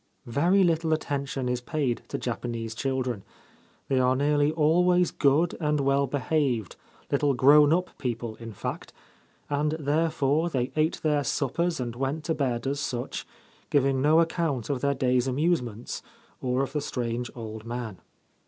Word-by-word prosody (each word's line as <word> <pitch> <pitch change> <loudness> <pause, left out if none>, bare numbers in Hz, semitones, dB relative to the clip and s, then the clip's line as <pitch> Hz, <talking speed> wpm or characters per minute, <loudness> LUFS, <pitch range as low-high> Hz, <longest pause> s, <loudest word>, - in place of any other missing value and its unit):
Very 170 +11 +3
little 165 -2 +2
attention 140 -4 -2
is 125 0 -1
paid 135 -3 -1
to - - -3
Japanese 115 -2 -4
children. 130 -3 -2 0.7
They 135 - +2
are 130 0 +3
nearly 145 +2 +2
always 175 +3 +3
good 150 +5 +2
and 150 -2 +1
well 140 0 +2
behaved, 135 - 0 0.4
little 140 -1 +2
grown 145 +3 +6
up 180 +2 0
people 120 -3 -3
in 115 -1 -8
fact; 105 - -6 0.5
and 150 +1 0
therefore 155 0 +1
they 130 -4 -1
ate 155 +1 +1
their 150 -2 +2
suppers 165 +5 -1
and 120 -2 -3
went 135 +5 -2
to 160 - 0
bed 125 -5 -1
as 140 +1 -1
such, 125 -3 -4 0.4
giving 135 -2 +2
no 155 +3 +5
account 160 -7 0
of 130 -3 -2
their 140 0 +1
day's 125 -1 +1
amusements, 125 -5 -1 0.4
or 130 +1 +1
of 135 - -5
the 150 - 0
strange 120 -3 -3
old 110 -2 -7
man. 115 -4 -5
140 Hz, 155 wpm, -27 LUFS, 125-155 Hz, 0.7 s, grown